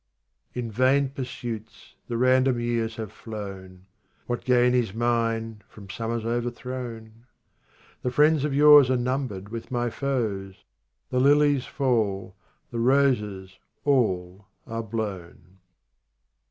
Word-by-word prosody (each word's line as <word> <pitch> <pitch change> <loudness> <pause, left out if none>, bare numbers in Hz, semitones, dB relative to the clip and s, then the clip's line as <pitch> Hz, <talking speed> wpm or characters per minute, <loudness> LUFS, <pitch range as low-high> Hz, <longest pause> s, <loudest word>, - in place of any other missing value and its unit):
37 125 -1 -2
In 115 - -6
vain 130 +4 +3
pursuits 120 -4 -7
the 120 - -2
random 130 0 +3
years 115 -1 -1
have 110 -3 -6
flown; 95 -4 -9 0.4
What 120 0 -3
gain 125 -1 +3
is 120 -5 0
mine 115 -2 -1
from 100 -3 -11
summers 115 +1 -3
overthrown? 120 -1 -5 0.7
The 125 - -1
friends 150 +3 +3
of 150 - 0
yore 150 +1 +8
are 130 - +2
numbered 125 -6 -3
with 115 0 -7
my 120 -1 -1
foes; 105 -9 -3 0.5
The 125 - +1
lilies 145 0 +4
fall, 105 -8 -1 0.4
the 120 - -3
roses 105 -8 +1 0.3
all 100 -8 0 0.2
are 115 0 -4
blown. 95 -4 -6
115 Hz, 120 wpm, -25 LUFS, 105-130 Hz, 0.7 s, yore